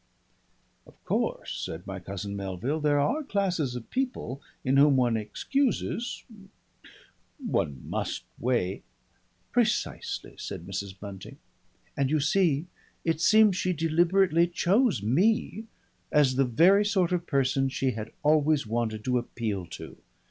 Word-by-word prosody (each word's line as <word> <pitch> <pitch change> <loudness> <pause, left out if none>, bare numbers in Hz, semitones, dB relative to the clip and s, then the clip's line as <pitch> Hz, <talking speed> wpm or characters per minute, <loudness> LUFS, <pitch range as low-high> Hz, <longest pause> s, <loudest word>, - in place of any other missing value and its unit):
"Of - - -21
course," - - -2
said 80 +3 -6
my 95 -1 -6
cousin 100 +2 -6
Melville, 100 - -3
"there 145 -1 +2
are 260 - +1
classes 185 - -1
of 120 -2 -8
people 250 - -3 0.2
in 130 +1 +2
whom 140 -1 +6
one 120 -2 +2
excuses 235 - -1 1.1
One 85 - -2
must - - -3 0.2
weigh 115 -7 0 0.3
" - - -41
"Precisely," - - -1
said 85 - -6
Mrs. 95 0 -5
Bunting. 100 -2 -9 0.6
"And 135 -1 +1
you 155 +1 +2
see 155 0 +2 0.4
it 165 -1 0
seems 215 0 +5
she 185 0 0
deliberately 170 +2 +3
chose 190 - +2
me 210 - +1 0.5
as 140 -4 +4
the 135 +1 +3
very 175 - +5
sort 195 -4 +1
of 175 -1 -1
person 135 -1 +1
she 135 0 0
had 110 -1 -6
always 150 -1 +3
wanted 110 -1 -2
to 125 -1 +2
appeal 110 -6 -4
to. - - -9
140 Hz, 135 wpm, -27 LUFS, 110-180 Hz, 1.1 s, whom